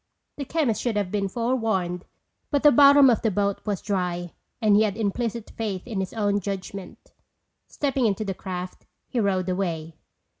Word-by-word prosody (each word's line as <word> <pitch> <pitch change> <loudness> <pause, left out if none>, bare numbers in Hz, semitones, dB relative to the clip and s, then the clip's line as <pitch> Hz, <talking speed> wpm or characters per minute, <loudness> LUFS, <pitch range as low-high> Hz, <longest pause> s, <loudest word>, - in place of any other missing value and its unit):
The 280 - -4
chemist 280 -7 0
should 235 -4 -1
have 200 -3 -1
been 200 -2 0
forewarned 215 -6 -1 0.4
but 285 -1 0
the 295 - +8
bottom 280 +1 +7
of 240 -3 +3
the 225 - +2
boat 200 0 -1
was 200 -3 -2
dry 180 -4 -2 0.3
and 215 -3 +4
he 210 - +5
had 210 -2 0
implicit 225 +1 -2
faith 205 -5 -4
in 220 -5 -3
his 190 -1 -3
own 205 -2 0
judgment. 195 -1 -7 0.5
Stepping 270 -4 0
into 215 +1 -1
the 195 - -2
craft 180 -1 -7 0.2
he 245 - -2
rowed 190 -4 +1
away. 170 -4 -2
205 Hz, 175 wpm, -25 LUFS, 185-235 Hz, 0.5 s, the